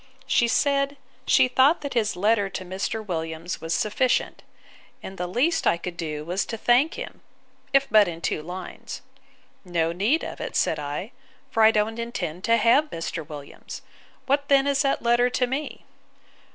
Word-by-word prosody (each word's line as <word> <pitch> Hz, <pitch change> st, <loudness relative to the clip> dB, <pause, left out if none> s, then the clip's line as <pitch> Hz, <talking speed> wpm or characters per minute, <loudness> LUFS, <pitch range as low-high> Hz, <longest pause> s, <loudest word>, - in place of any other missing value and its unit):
She 235 Hz, -, +3 dB
said, 280 Hz, +2 st, +1 dB, 0.3 s
she -, -, +5 dB
thought 265 Hz, +5 st, +4 dB
that 285 Hz, -, -5 dB
his 220 Hz, -3 st, +1 dB
letter 205 Hz, +1 st, +2 dB
to 185 Hz, 0 st, -6 dB
Mr. 195 Hz, +4 st, -3 dB
Williams 165 Hz, -1 st, -4 dB
was 165 Hz, -, -5 dB
sufficient; 245 Hz, +4 st, 0 dB, 0.6 s
and 190 Hz, -, -7 dB
the 180 Hz, -, -2 dB
least 255 Hz, -, +1 dB
I -, -, +3 dB
could 175 Hz, 0 st, -6 dB
do 155 Hz, -3 st, -5 dB
was 180 Hz, +4 st, -1 dB
to 225 Hz, -, -4 dB
thank 245 Hz, +8 st, +3 dB
him, -, -, -8 dB, 0.5 s
if 275 Hz, 0 st, +4 dB
but 210 Hz, -2 st, +5 dB
in 165 Hz, -1 st, -5 dB
two 155 Hz, -, -2 dB
lines. 180 Hz, +3 st, -8 dB, 0.6 s
No 170 Hz, -3 st, 0 dB
need 210 Hz, -, +1 dB
of -, -, -6 dB
it, -, -, -5 dB
said -, -, +1 dB
I; 150 Hz, -, -5 dB, 0.4 s
for 225 Hz, -, +1 dB
I 220 Hz, -, +8 dB
don't 220 Hz, +1 st, 0 dB
intend 185 Hz, -8 st, -4 dB
to 230 Hz, 0 st, +4 dB
have 265 Hz, +7 st, +4 dB
Mr. 165 Hz, -, -4 dB
Williams: 145 Hz, -2 st, -9 dB, 0.4 s
What 280 Hz, +1 st, +1 dB
then 275 Hz, -1 st, +5 dB
is 280 Hz, -1 st, +2 dB
that 275 Hz, -2 st, 0 dB
letter 240 Hz, +1 st, +3 dB
to 250 Hz, 0 st, +1 dB
me? 270 Hz, +4 st, -5 dB
220 Hz, 175 wpm, -25 LUFS, 175-260 Hz, 0.6 s, I